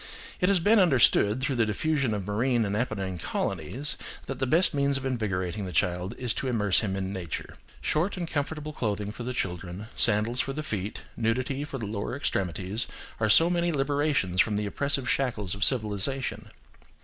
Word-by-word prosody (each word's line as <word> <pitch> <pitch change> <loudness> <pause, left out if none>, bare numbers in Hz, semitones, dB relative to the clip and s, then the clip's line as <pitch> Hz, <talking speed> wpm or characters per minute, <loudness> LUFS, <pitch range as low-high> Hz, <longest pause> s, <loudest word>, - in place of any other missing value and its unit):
It 180 - +3
has 195 -2 +4
been 210 +6 +5
understood, 130 - +4
through 135 -1 0
the 115 - +3
diffusion 140 +3 0
of 100 -2 -4
marine 115 +3 +1
and 100 0 -1
Apennine 100 -6 -2
colonies, 140 - -1 0.3
that 135 -2 -5
the 130 - 0
best 165 +8 +3
means 140 -1 +2
of 135 - -6
invigorating 100 -6 -2
the - - -5
child 90 +5 0
is 125 -3 -1
to 135 - -3
immerse 105 -6 +3
him 100 -4 -1
in 95 0 -3
nature. 90 -4 -5 0.3
Short 175 +6 0
and 175 -2 -3
comfortable 150 0 -3
clothing 105 -5 -2
for 120 +3 -5
children, 95 -1 -4
sandals 115 +2 +4
for 135 - 0
the 155 +2 -4
feet, 105 -7 -4
nudity 130 +4 -1
of 150 - -5
the 130 -5 -4
lower 105 +3 -3
extremities, 95 - -1 0.3
are 110 -1 +1
so 165 +10 +7
many 175 0 +1
liberations 140 - +1
from 105 - +1
the 105 0 -1
oppressive 135 +4 -1
shackles 115 -10 0
of 100 +1 -1
civilisation. 130 +3 0
120 Hz, 180 wpm, -27 LUFS, 100-140 Hz, 0.3 s, so